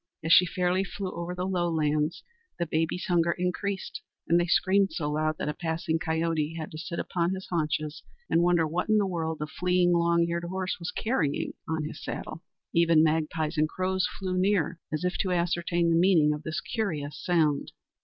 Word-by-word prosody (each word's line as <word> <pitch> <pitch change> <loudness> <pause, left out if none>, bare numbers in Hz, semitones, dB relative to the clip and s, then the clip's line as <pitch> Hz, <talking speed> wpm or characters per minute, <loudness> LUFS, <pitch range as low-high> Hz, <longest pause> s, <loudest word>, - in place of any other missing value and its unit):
As 165 +1 +4
she 180 - +7
fairly 180 +2 +1
flew 195 0 -5
over 170 +1 -5
the 180 0 -2
lowlands, 160 -4 0 0.3
the 170 - 0
babies' 165 +2 -1
hunger 170 -1 +3
increased 185 +2 -3 0.3
and 170 +1 +4
they 175 - +1
screamed 195 +3 +3
so 150 -3 -2
loud 155 +1 0
that - - -3
a 150 - -1
passing 165 0 -2
coyote 160 -1 -1
had 155 -1 -5
to 155 - -7
sit 170 +1 -5
upon 175 +1 -1
his 190 - -7
haunches 155 -2 -1 0.3
and 165 - +3
wonder 175 -2 +3
what 170 +6 -2
in 215 - +5
the 205 - +3
world 165 -4 -2
the 150 - -3
fleeing 175 +4 +2
long 170 0 +3
eared 170 0 -2
horse 185 +1 -3
was 170 0 -4
carrying 180 - -1 0.2
on 160 -1 -1
his 150 - -7
saddle. 160 - -5 0.3
Even 170 -2 +5
magpies 155 0 0
and 155 0 +2
crows 185 +1 0
flew 185 -1 -2
near 185 -4 +1
as 155 +2 -2
if 180 0 -1
to 190 - 0
ascertain 175 -1 +1
the - - +4
meaning 165 -4 +4
of 150 - -5
this 155 0 -3
curious 155 -10 -3
sound. 160 -5 +1
170 Hz, 195 wpm, -28 LUFS, 160-180 Hz, 0.3 s, she